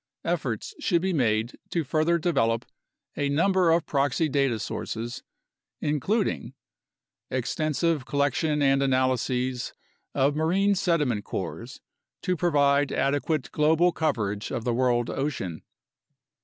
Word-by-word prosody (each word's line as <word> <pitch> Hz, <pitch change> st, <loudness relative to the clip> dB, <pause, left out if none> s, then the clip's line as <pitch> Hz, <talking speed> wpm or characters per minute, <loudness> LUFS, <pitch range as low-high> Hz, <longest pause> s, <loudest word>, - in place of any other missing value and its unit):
Efforts -, -, -2 dB
should 175 Hz, -, +1 dB
be 190 Hz, -1 st, +1 dB
made 115 Hz, -5 st, 0 dB
to 170 Hz, -, 0 dB
further 155 Hz, +4 st, +2 dB
develop 135 Hz, -9 st, +1 dB, 0.5 s
a 145 Hz, -1 st, 0 dB
number 180 Hz, +4 st, +3 dB
of 165 Hz, 0 st, +3 dB
proxy 140 Hz, +2 st, +1 dB
data 135 Hz, -5 st, +1 dB
sources, 115 Hz, +2 st, -5 dB, 0.6 s
including: 150 Hz, -, -1 dB, 0.7 s
Extensive 155 Hz, -2 st, 0 dB
collection 145 Hz, +2 st, 0 dB
and 135 Hz, 0 st, +3 dB
analyses 130 Hz, -1 st, 0 dB, 0.4 s
of 140 Hz, +2 st, +2 dB
marine 185 Hz, +6 st, +2 dB
sediment 165 Hz, -, +1 dB
cores -, -, -6 dB, 0.4 s
to 185 Hz, -, +1 dB
pro 175 Hz, +1 st, +1 dB
vide 140 Hz, -2 st, +3 dB
adequate 145 Hz, 0 st, 0 dB
global 160 Hz, +4 st, +3 dB
coverage 110 Hz, -11 st, -1 dB
of 120 Hz, -4 st, -3 dB
the 120 Hz, -, 0 dB
world 120 Hz, -1 st, +1 dB
ocean. 120 Hz, -, -3 dB
145 Hz, 115 wpm, -26 LUFS, 125-165 Hz, 0.7 s, number